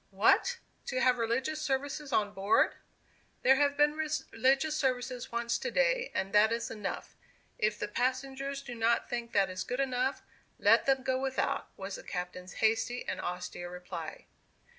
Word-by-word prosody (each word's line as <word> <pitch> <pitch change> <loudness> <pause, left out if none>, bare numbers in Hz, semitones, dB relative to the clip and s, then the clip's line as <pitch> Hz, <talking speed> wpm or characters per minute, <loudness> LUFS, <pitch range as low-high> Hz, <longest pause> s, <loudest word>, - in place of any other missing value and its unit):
"What! 485 0 +3 0.3
to 255 - -1
have 255 -1 +3
religious 260 +7 0
services 285 0 -2
on 205 -3 +1
board?" 200 +2 +3 0.7
"There 265 +1 +6
have 285 0 +2
been 295 0 +5
religious 300 -1 +1
services 255 -3 -1
once 235 0 0
to - - -2
day, - - +2
and 195 +1 -1
that 210 +1 +6
is 235 0 -2
enough. 210 -3 -5 0.4
If 210 0 +1
the - - -3
passengers 270 +4 -2
do 245 -3 -7
not 230 0 +1
think 235 -1 -4
that 195 -1 +4
is 185 0 -4
good 250 - -3
enough, 260 0 0 0.3
let - - +4
them 265 -1 +3
go 260 0 +1
without," 265 0 -1
was 195 0 -5
the - - -10
captain's 180 0 -5
hasty 225 +2 +1
and - - -3
austere 175 0 -5
reply. 180 -2 -7
250 Hz, 160 wpm, -31 LUFS, 215-275 Hz, 0.7 s, There